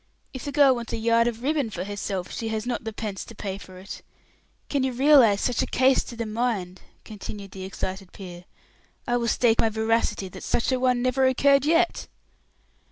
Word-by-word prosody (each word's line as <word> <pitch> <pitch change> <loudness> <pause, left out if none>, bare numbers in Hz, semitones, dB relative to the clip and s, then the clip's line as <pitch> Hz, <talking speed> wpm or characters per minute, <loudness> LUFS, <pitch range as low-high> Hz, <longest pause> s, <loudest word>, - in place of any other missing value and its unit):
If 260 - -7
the 285 - -3
girl 280 -2 +5
wants 235 -2 -5
a - - -1
yard 230 +1 +3
of 235 0 -4
ribbon 290 -4 0
for 180 -4 -5
herself, 200 -2 -4
she 225 - -4
has 220 0 -3
not 245 -2 -3
the 225 - -3
pence 210 -3 -5
to 230 - -12
pay 195 -1 -5
for 185 -2 -12
it! 190 +2 -9 0.7
Can 280 - 0
you 260 -1 0
realize 255 -6 +5
such 245 -2 +1
a - - -1
case 260 0 +3
to 240 - -9
the 230 0 -3
mind?" 215 -5 -2 0.2
continued 205 -2 -8
the 190 -1 -7
excited 190 0 -5
peer. 180 -2 -10 0.6
"I 240 0 +2
will 235 -1 -1
stake 230 0 +2
my 225 - +4
veracity 220 -2 0
that - - -10
such 235 - 0
a 255 - +1
one 250 -1 +2
never 260 +1 +2
occurred 275 +2 +4
yet." 335 +3 +2
230 Hz, 205 wpm, -25 LUFS, 200-255 Hz, 0.7 s, girl